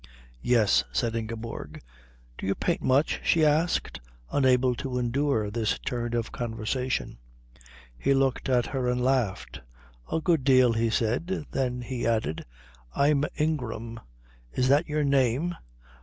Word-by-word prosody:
"Yes," 105 - +3
said 115 - -1
Ingeborg. 115 0 -5 0.6
"Do - - -4
you 100 - +1
paint 175 - -1
much?" 135 +4 +2
she 160 -2 +3
asked, 155 +3 +1 0.3
unable 130 -2 +3
to 130 -2 -3
endure 125 -3 0
this 110 -1 0
turn 120 -2 -3
of 115 -1 0
the - - -13
conversation. 120 - -3 0.8
He 140 - +2
looked 135 -1 0
at 125 -2 +3
her 130 -2 -2
and 125 0 0
laughed. 105 - -1 0.5
"A - - +1
good 160 -4 +1
deal," 130 -3 +5
he 115 0 +1
said. 125 - -1
Then 125 -2 -1
he 120 -1 -3
added, 110 - -1 0.5
"I'm 145 0 +3
Ingram." 120 -7 -2 0.5
"Is 130 - 0
that 145 +4 +3
your 150 0 0
name? 140 +4 +2
125 Hz, 140 wpm, -27 LUFS, 115-140 Hz, 0.8 s, deal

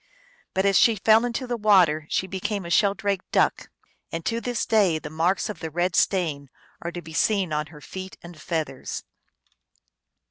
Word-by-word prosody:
But 190 +1 +1
as 195 -1 +4
she 230 - +5
fell 220 +3 +4
into 245 +2 -3
the 245 -1 -2
water 180 -8 +4
she - - 0
became 190 +1 -3
a 170 - -6
sheldrake 200 -1 +2
duck. - - +1 0.4
And 165 0 -5
to 230 0 -1
this 245 -1 -2
day 200 -7 +3
the 155 -1 -8
marks 170 +6 +1
of 210 -6 -6
the 160 - -5
red 175 +3 -1
stain 155 -8 +1 0.3
are 170 - -4
to 175 0 -7
be 160 - -11
seen 190 -2 +1
on 150 0 -1
her 150 -1 -14
feet 190 +3 -8
and 170 -2 -11
feathers. 155 -6 -4
185 Hz, 180 wpm, -25 LUFS, 160-205 Hz, 0.4 s, she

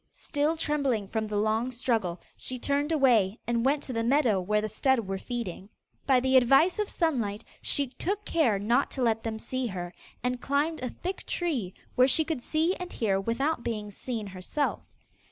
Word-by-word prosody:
Still 300 +2 0
trembling 275 -9 0
from 220 +1 -2
the 210 -1 -2
long 220 +4 +1
struggle, 230 -8 -1 0.2
she 255 - -4
turned 285 +4 0
away, 235 -9 +4
and 235 -1 0
went 280 +3 +2
to 255 - -5
the 230 -1 0
meadow 240 -6 +3
where 210 +4 +1
the 215 - -1
stud 265 +5 +2
were 195 -2 -4
feeding. 210 -6 -5 0.4
By 265 -2 +5
the 260 +1 +4
advice 270 - +5
of 420 - 0
Sunlight, 235 - -1 0.2
she 285 - +1
took 400 +9 -3
care 250 -11 +2
not 235 +7 +2
to 260 - +1
let 225 -1 +2
them 225 -1 -3
see 255 +3 -2
her, 180 -3 -5 0.3
and 250 0 -1
climbed 290 +3 0
a 255 - -2
thick 370 +8 -5
tree, 265 - -2 0.2
where 255 +1 +5
she 310 +4 +3
could 310 -6 -2
see 320 +7 +1
and 360 0 -6
hear 195 -4 0
without 240 +6 -1
being 210 -3 -3
seen 225 +1 -4
herself. 195 +10 -2
245 Hz, 190 wpm, -28 LUFS, 215-285 Hz, 0.4 s, By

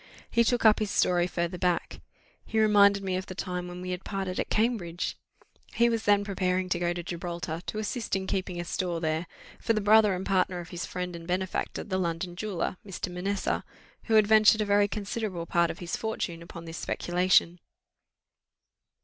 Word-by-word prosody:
He 235 - +4
took 240 0 +1
up 215 -1 +7
his 215 -2 -1
story 175 -2 +2
farther 175 0 -3
back. 180 -1 -1 0.4
He 220 - -1
reminded 200 -2 +5
me 185 -1 -1
of 185 - -5
the 185 - -7
time 180 -1 -4
when 180 0 -7
we 185 - -4
had 180 0 -4
parted 190 -2 -3
at - - -2
Cambridge; 210 -7 0 0.6
he 235 0 +4
was 225 -1 -1
then 205 0 +4
preparing 185 -2 0
to 175 - 0
go 175 0 +1
to 175 0 -4
Gibraltar, 170 -1 -4
to - - -4
assist 220 +2 -2
in 190 0 -2
keeping 185 -2 -2
a 175 - -3
store 175 -1 -2
there, 160 +1 -1 0.3
for 230 - +1
the 215 - +1
brother 210 -1 +5
and 185 - -5
partner 185 -2 +1
of 175 0 -8
his 175 -1 -5
friend 180 -1 -4
and 165 0 -9
benefactor, 185 +1 -2
the 190 -3 -2
London 175 0 -2
jeweller, 185 -2 -3
Mr. 190 -2 -5
Manessa, 195 +2 -1 0.4
who 225 - +2
had 215 -1 +7
ventured 215 0 +6
a - - +1
very 205 0 +4
considerable 205 -3 -4
part 170 0 +2
of - - -5
his 175 -3 -4
fortune 185 -6 -3
upon 170 0 -10
this 165 0 -7
speculation. 180 0 +2
185 Hz, 195 wpm, -28 LUFS, 175-205 Hz, 0.6 s, up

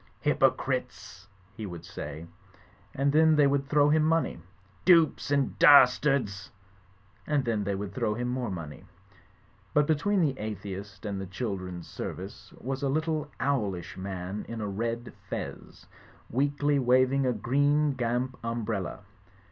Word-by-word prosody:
"H)rpocritesl" - - 0 0.3
he 110 -3 -6
would 85 -2 -8
say; 80 -2 -7 0.7
and 140 +1 +2
then 160 +1 +5
they 150 -1 +5
would 140 0 +1
throw 145 -1 +4
him 155 +1 +4
money. 160 - +1 0.4
"Dupes 165 -3 +4
and 140 -2 0
das 130 -4 +8
tards 125 -9 0 0.8
I" 155 - -3
and 140 -2 +1
then 110 -3 0
they 100 0 -1
would 100 0 -5
throw 105 +1 -1
him 120 +2 -2
more 125 -2 -2
money. 85 -5 -7 0.9
But 150 0 +5
between 175 +7 +1
the 140 -5 0
atheist 100 -1 -6
and 100 -2 -3
the 95 - -6
children's 95 -4 -5
service - - -7
was 135 +2 -4
a 140 - 0
little 155 0 -1
owlish 105 -11 -1
man 95 +1 -5
in 115 - -5
a 105 - -3
red 115 +4 -3 0.2
fez, - - -7 0.5
weakly 145 +2 +1
waving 130 +1 +3
a - - +3
green 145 +6 +2
gamp 125 +1 -2
umbrella. 115 -5 -3
125 Hz, 145 wpm, -28 LUFS, 100-145 Hz, 0.9 s, das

